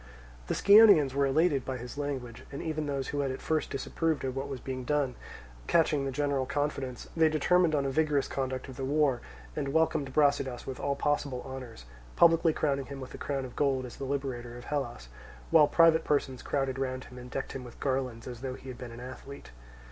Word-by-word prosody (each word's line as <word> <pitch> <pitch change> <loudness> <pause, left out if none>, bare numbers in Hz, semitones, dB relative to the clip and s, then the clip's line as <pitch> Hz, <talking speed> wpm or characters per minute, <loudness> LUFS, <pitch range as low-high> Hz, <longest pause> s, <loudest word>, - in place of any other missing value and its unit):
The - - -1
Scionaeans 200 -10 +7
were 140 0 +2
elated 145 -1 +2
by 130 -1 -4
his 120 0 -8
language, 135 -5 -4
and 140 - -6
even 155 -2 -3
those 140 -2 -2
who 145 - -2
had 140 -1 0
at 130 - -4
first 160 -1 -1
disapproved 160 +2 -1
of 130 -1 -3
what 135 +1 -3
was 135 -2 -5
being 130 0 -5
done 140 -1 0 0.5
catching 155 -4 +3
the 135 - -2
general 140 -1 0
confidence, 140 -3 -2
they 160 -1 +5
determined 160 +2 +3
on 140 -1 +1
a 135 - 0
vigorous 150 -1 +1
conduct 130 -1 -3
of 130 - -10
the 135 - -4
war, 140 -2 +2 0.3
and - - -2
welcomed 160 -3 +1
Brasidas 140 -3 +1
with 130 -1 -6
all 140 0 0
possible 145 -4 -1
honours, 130 - -8 0.3
publicly 165 -1 +5
crowning 140 -4 -1
him 140 0 -7
with 130 -1 -8
a - - -8
crown 135 -2 -2
of 125 - -10
gold 135 -3 +1
as 125 - -10
the 140 - -5
liberator 130 -3 -3
of 120 - -10
Hellas; 120 - -3 0.4
while 155 -3 +7
private 165 0 +5
persons 135 -3 0
crowded 135 -2 -1
round 130 -1 -2
him 125 0 -11
and 125 0 -10
decked 135 - -4
him 135 - -6
with 120 -1 -12
garlands 130 -4 -2
as 120 -2 -7
though 130 -1 -4
he 135 - -10
had 125 - -8
been 125 -2 -7
an 115 - -9
athlete. 130 - -9
135 Hz, 215 wpm, -30 LUFS, 130-150 Hz, 0.5 s, Scionaeans